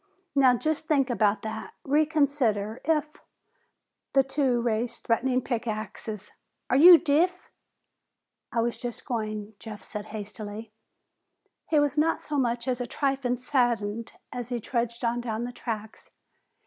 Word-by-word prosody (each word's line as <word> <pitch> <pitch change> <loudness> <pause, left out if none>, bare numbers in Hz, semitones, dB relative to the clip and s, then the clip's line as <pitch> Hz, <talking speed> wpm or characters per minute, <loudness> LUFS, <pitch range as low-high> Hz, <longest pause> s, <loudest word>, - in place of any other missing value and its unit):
"Now 260 -3 +5
just 315 +3 -2
think 275 -4 +2
about 210 -3 +2
that! 220 0 -6
Reconsider! 280 -8 +1
If 305 -1 0 0.5
" - - -54
The 270 - +5
two 270 -2 +1
raised 235 0 -1
threatening 255 +2 +1
pick 240 -2 -2
axes. 215 -1 -5 0.4
"Are - - +4
you 340 +5 +10
deef?" 345 +4 +1 1.0
"I 230 - +1
was 235 +1 -1
just 240 -1 -5
going," 215 -4 -3
Jeff 215 -2 -9
said 210 -1 -6
hastily. 210 +1 -7 1.0
He 305 - +4
was 290 0 +1
not 325 +2 +2
so 295 -2 -2
much 235 -1 0
as 250 -1 0
a 245 - -3
trifle 270 -3 0
saddened 235 -4 0 0.2
as 245 -1 -5
he 245 -1 -2
trudged 235 +1 -2
on 235 +1 0
down 225 -1 -3
the 245 - -4
tracks. 220 -3 -6
240 Hz, 145 wpm, -27 LUFS, 220-275 Hz, 1.0 s, you